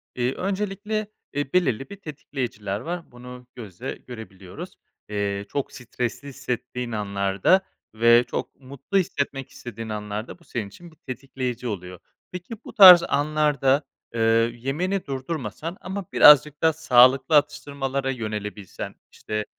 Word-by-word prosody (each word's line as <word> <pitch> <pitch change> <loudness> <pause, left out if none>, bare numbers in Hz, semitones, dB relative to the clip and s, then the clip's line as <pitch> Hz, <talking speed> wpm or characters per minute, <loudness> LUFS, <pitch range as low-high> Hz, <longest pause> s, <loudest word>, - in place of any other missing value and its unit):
İii, 125 +1 0
öncelikle, 205 +2 -2 0.3
eee, 145 -1 -3
belirli 135 -8 +1
bir - - -8
tetikleyiciler 125 - -5
var, 170 +7 -6
bunu 125 0 -11
gözle 115 +1 -7
görebiliyoruz. 100 -6 -10 0.3
Eee, 100 -1 -2
çok 140 - -3
stresli 125 +1 -5
hissettiğin 125 -2 -4
anlarda 100 - +1 0.3
ve 115 +2 +5
çok - - -4
mutlu 140 +8 -4
hissetmek 140 -8 -2
istediğin 115 -2 -8
anlarda 105 +6 -5
bu - - -22
senin 115 -10 -4
için 170 - -14
bir - - -21
tetikleyici 130 -1 -5
oluyor. 90 -4 -6 0.3
Peki, 180 +6 -7
bu - - -9
tarz 185 -6 +10
anlarda, 145 -1 +2 0.3
eee, 115 - -4 0.4
yemeni 175 +10 -2
durdurmasan 140 - -5
ama 190 +1 -5
birazcık 150 0 +7
daha 160 0 +4
sağlıklı 135 -1 +5
atıştırmalara 140 -2 0
yönelebilsen. 105 -5 -6 0.2
İşte, 105 0 -4
130 Hz, 125 wpm, -24 LUFS, 110-155 Hz, 0.4 s, tarz